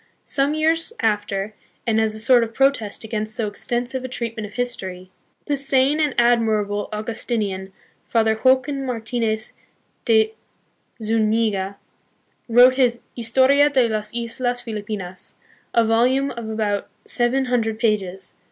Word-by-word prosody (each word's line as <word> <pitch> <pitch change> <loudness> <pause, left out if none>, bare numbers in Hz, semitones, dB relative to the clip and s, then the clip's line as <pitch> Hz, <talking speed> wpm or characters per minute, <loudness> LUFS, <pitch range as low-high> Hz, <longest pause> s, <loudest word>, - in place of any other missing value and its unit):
Some 280 +2 +1
years 325 +4 +1
after, 205 -1 -1 0.3
and 220 -2 +2
as 220 -1 0
a - - -1
sort 240 +2 +5
of 225 0 -6
protest 270 -7 +1
against 215 -1 -2
so 225 - -1
extensive 245 +5 -3
a - - -3
treatment 230 -3 -4
of 205 - -15
history, 185 -7 -3 0.3
the 290 - 0
sane 275 +1 +2
and 300 -3 +1
admirable 220 -4 +2
Augustinian, 210 -3 -3 0.4
Father 220 -1 +2
Joaquin 265 +2 +3
Martinez 225 -2 -2 0.5
de 220 -2 +3 0.7
Zuniga, 215 -3 0 0.7
wrote 250 +3 +6
his 245 -3 +2
Historia 265 +5 +4
de 260 -4 +3
las 215 -1 -3
Islas 245 +1 -2
Filipinas, 205 -5 -5 0.4
a 230 -1 +5
volume 255 +5 +2
of 230 -2 -6
about 210 -2 -2 0.2
seven 250 +2 +1
hundred 230 -3 0
pages. 195 -4 -1
230 Hz, 130 wpm, -22 LUFS, 215-255 Hz, 0.7 s, wrote